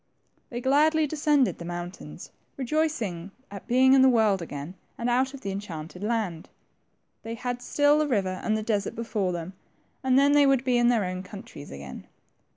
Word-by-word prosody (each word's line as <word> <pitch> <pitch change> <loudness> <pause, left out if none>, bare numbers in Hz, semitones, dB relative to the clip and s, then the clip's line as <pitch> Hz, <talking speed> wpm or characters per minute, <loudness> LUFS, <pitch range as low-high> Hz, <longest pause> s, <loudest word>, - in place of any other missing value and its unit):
They 240 0 -5
gladly 305 +4 +3
descended 295 -3 +1
the - - -6
mountains, 175 +1 -7 0.3
rejoicing 245 - -1 0.2
at 200 -2 -9
being 260 +2 +5
in 270 - +6
the 265 - +7
world 220 -6 +3
again, 145 0 -6 0.2
and 240 +1 -1
out 260 +3 +1
of 270 - -11
the 195 - -4
enchanted 180 -2 -7
land. 210 -7 -2 0.7
They 225 +1 -6
had 245 +1 -4
still 290 +3 +3
the 305 - +1
river 190 -7 -1
and 215 0 +1
the 215 - -3
desert 210 -2 -1
before 215 -5 -2
them, 175 +1 -5 0.5
and 260 0 +3
then 280 +1 +5
they 290 -1 +5
would 270 -2 +3
be 250 -2 +2
in 240 - +4
their 235 -5 +2
own 185 0 -4
countries 185 -6 -10
again. 70 -1 -9
230 Hz, 180 wpm, -26 LUFS, 185-265 Hz, 0.7 s, the